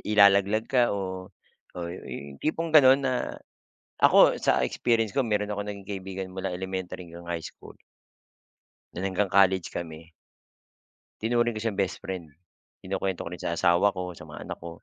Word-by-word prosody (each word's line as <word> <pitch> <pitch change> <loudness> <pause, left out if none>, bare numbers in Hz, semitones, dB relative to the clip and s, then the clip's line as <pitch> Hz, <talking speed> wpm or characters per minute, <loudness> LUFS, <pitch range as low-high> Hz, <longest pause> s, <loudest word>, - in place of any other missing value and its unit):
ilalaglag 100 +2 +5
ka, 125 -3 +3
oh, 95 -1 -5 0.5
oy, 85 0 -4 0.4
yung 70 - -13
tipong 165 +1 -1
ganun 135 -1 +7
na 130 -1 -1 0.7
ako - - +6
sa - - +3
experience 115 -3 0
ko, 135 - +3
meron 105 -2 -1
akong 105 0 -4
naging 100 -1 -8
kaibigan 95 -1 -5
mula 95 0 -3
elementary 95 -1 -5
hanggang 85 +1 -11
high 85 -2 -3
school - - -12 1.2
na - - -5
hanggang 95 +1 0
college 95 -2 +3
kami. 80 -1 -7 1.1
Tinuring 120 0 +1
ko 110 - -4
siyang 110 -3 -2
bestfriend 90 -5 -3 0.5
kinukwento 95 -1 -2
ko - - -6
rin 90 - -7
sa 85 - -2
asawa 90 +3 +3
ko, 90 -1 -4
sa 85 - -11
mga - - -9
anak - - -7
ko. 85 0 -10
95 Hz, 160 wpm, -27 LUFS, 90-105 Hz, 1.2 s, ganun